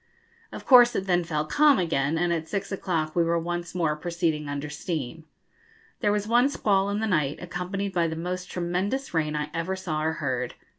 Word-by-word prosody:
Of - - -9
course 245 -2 +7
it 190 - -1
then 175 -2 +2
fell 155 -2 -2
calm 290 - +4
again, 160 -4 0
and 175 +1 +1
at 160 -1 -3
six 200 +1 -3
o'clock 165 -5 -2
we 170 - +4
were 170 0 +1
once 175 +1 -4
more 160 -4 +1
proceeding 160 -2 -2
under 145 +1 -3
steam. 155 -1 -5 0.7
There 205 - +2
was 210 0 -1
one 240 +4 +4
squall 200 -7 +1
in 205 +1 -1
the - - +1
night, 150 -9 0
accompanied 180 +3 -4
by 170 -2 +2
the 160 - -4
most 180 +2 -4
tremendous 185 +10 -2
rain 155 -2 0
I 150 0 -3
ever 170 +3 -2
saw 165 -5 -3
or 160 +1 +1
heard. 130 -6 -3
175 Hz, 200 wpm, -26 LUFS, 155-195 Hz, 0.7 s, course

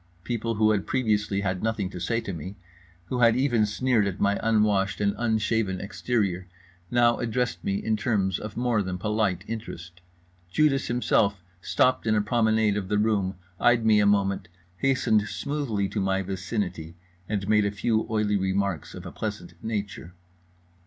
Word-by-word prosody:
People 115 0 -2
who 110 0 +4
had 100 -2 0
previously 105 -5 0
had 95 -2 -2
nothing 110 -3 -1
to 90 - -7
say 115 +6 0
to 100 -4 -5
me, 90 +5 -7 0.5
who 125 +8 -3
had 115 -1 +5
even 120 -5 +2
sneered 110 0 +1
at 100 0 -4
my 100 0 +2
unwashed 105 -3 +2
and 100 -1 +1
unshaven 110 -4 0
exterior, 100 -3 -2 0.4
now 120 -1 +3
addressed 120 -6 -1
me 100 - 0
in 110 +2 0
terms 100 -4 0
of 105 0 -7
more 120 -3 +1
than 95 -2 -3
polite 105 -2 0
interest. 90 -6 -7 0.5
Judas 140 +5 +2
himself 105 -5 +1 0.2
stopped 130 +2 +2
in 110 - +3
a 105 - +3
promenade 110 -2 +2
of 95 -2 -3
the 105 +1 +1
room, 105 -3 +1 0.2
eyed 120 -2 +3
me 110 -1 +5
a 105 - +4
moment, 100 -1 +1 0.3
hastened 115 -4 +2
smoothly 130 -10 -2
to 105 - -2
my 95 0 0
vicinity, 90 -3 -4 0.3
and 100 -2 -2
made 105 -1 +4
a - - +1
few 110 +3 0
oily 105 -2 +1
remarks 95 -3 -1
of - - -9
a - - -6
pleasant - - -5
nature. 100 -5 -4
105 Hz, 165 wpm, -26 LUFS, 95-115 Hz, 0.5 s, had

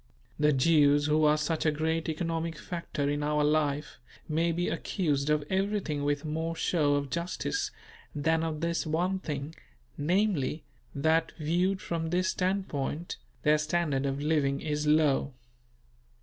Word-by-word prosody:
The 150 0 +4
Jews 145 0 +4
who 155 +1 +3
are 150 0 +4
such 155 +1 -1
a 155 - +3
great 160 +2 -1
economic 165 0 -2
factor 165 -5 -4
in 145 +1 0
our 150 0 +1
life 150 -1 0 0.3
may 165 +2 +1
be 175 +2 -1
accused 155 -4 -1
of 150 -1 +2
everything 190 -6 -1
with 145 +1 0
more 160 +2 -2
show 150 -4 +2
of 140 -2 -2
justice 175 - -2 0.5
than 160 +2 +1
of 160 -1 -3
this 170 0 -1
one 180 +5 0
thing; 150 -3 -5 0.5
namely, 165 -2 +1 0.3
that, 160 +3 +2
viewed 175 +5 0
from 165 -1 -3
this 180 +2 +1
standpoint, 175 -4 -2 0.3
their 150 0 +4
standard 150 -3 0
of 135 0 -2
living 145 -2 +1
is 150 -1 -2
low. 150 -2 +3
155 Hz, 145 wpm, -29 LUFS, 145-170 Hz, 0.5 s, The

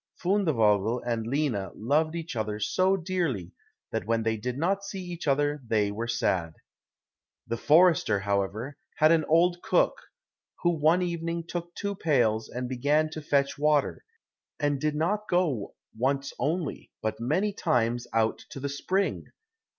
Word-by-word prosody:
Fundevogel 120 - +2
and 115 -2 -1
Lina 125 - -1
loved 155 +8 +1
each 165 -5 -5
other 105 -1 -2
so 185 - +2
dearly 165 - -2 0.4
that - - -3
when 115 0 +1
they 110 0 +1
did 125 +4 -4
not 195 +6 0
see 195 -1 -6
each 175 -2 -6
other 145 +1 +1
they 105 -2 +1
were 115 +3 -4
sad. 95 -9 0 0.9
The 115 - -3
forester, 155 - +4
however, 100 +7 -2 0.2
had 155 +1 +5
an 165 -1 +4
old 175 +2 +3
cook, - - +3 0.7
who 175 - +4
one 165 +3 +3
evening 170 -1 -2
took 175 0 -5
two 200 0 -2
pails 120 - +1
and 125 0 -4
began 145 +5 +1
to 160 - -6
fetch 140 -1 0
water, 150 -1 +2 0.6
and 145 -2 0
did 150 -1 0
not 205 +7 -1
go 160 - 0 0.2
once 135 +4 -1
only, 155 +4 -2
but 110 - -2
many 175 - 0
times, 120 - 0
out 115 0 +1
to - - -8
the 140 +1 -3
spring. 185 +8 -1
145 Hz, 150 wpm, -27 LUFS, 115-170 Hz, 0.9 s, had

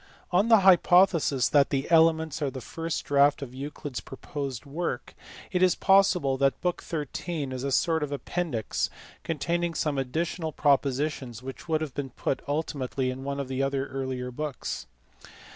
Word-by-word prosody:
On 185 +5 +3
the 225 -3 +6
hypothesis 175 -7 +5
that 145 -2 +4
the 135 -1 -1
Elements 160 -2 +4
are 145 - +1
the 130 - -7
first 165 +6 -4
draft 140 0 +3
of 125 -2 -8
Euclid 140 -1 -6
s - - 0
proposed 135 -1 -6
work, 160 +5 -4 0.4
it 180 -2 0
is 185 -1 +5
possible 185 -8 +3
that 135 -1 +2
book 180 -1 -1
xiu. 150 -1 -4
is 130 0 -4
a 140 - -1
sort 160 +4 +2
of 150 -1 -3
appendix 145 -4 -2 0.3
containing 170 +2 -1
some 145 -3 0
additional 160 +5 -2
propositions 135 -3 0
which 135 +5 -8
would 155 -1 +1
have 150 -4 -4
been 140 -1 -4
put 130 +2 -2
ultimately 140 -3 -2
in 130 +1 -7
one 140 0 -3
or - - -1
other 135 0 -2
of - - -4
the 140 - -1 0.2
earlier 130 -2 -3
books. 135 - -5
145 Hz, 170 wpm, -27 LUFS, 135-165 Hz, 0.4 s, the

